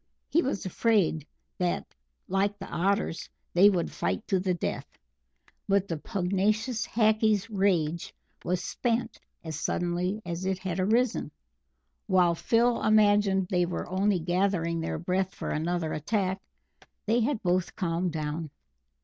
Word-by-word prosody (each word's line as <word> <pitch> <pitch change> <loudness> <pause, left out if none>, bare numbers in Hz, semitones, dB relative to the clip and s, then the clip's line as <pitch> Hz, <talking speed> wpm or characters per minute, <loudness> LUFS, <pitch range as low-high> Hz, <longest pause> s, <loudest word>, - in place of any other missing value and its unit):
He 335 - +4
was 265 - -2
afraid 185 -6 +1 0.3
that, 180 -1 0 0.4
like 200 +2 0
the 195 - -7
Otters, 195 -1 -1 0.2
they 190 +4 +7
would 180 -4 0
fight 90 +1 -2
to 190 - +2
the 180 -1 0
death. - - -4 0.7
But 200 -1 +2
the 165 - -2
pugnacious 210 - 0
Hackees' 215 -1 +2
rage 175 -5 +1 0.3
was 180 0 -1
spent 240 -1 -2 0.2
as 160 -2 -5
suddenly 175 +5 -1
as 170 +1 -4
it 190 0 0
had 185 -1 -4
arisen. 230 +5 +1 0.8
While 180 -3 +4
Phil 235 +7 +2
imagined 205 -3 +4
they 180 -1 +2
were 175 - -4
only 190 +2 +1
gathering 175 -1 0
their 160 - -2
breath 185 +3 -1
for - - -4
another 165 +1 -1
attack, 190 +4 -1 0.6
they 225 +3 +2
had 240 0 0
both 180 -1 0
calmed 175 -1 -1
down. 155 0 -3
190 Hz, 135 wpm, -28 LUFS, 175-210 Hz, 0.8 s, they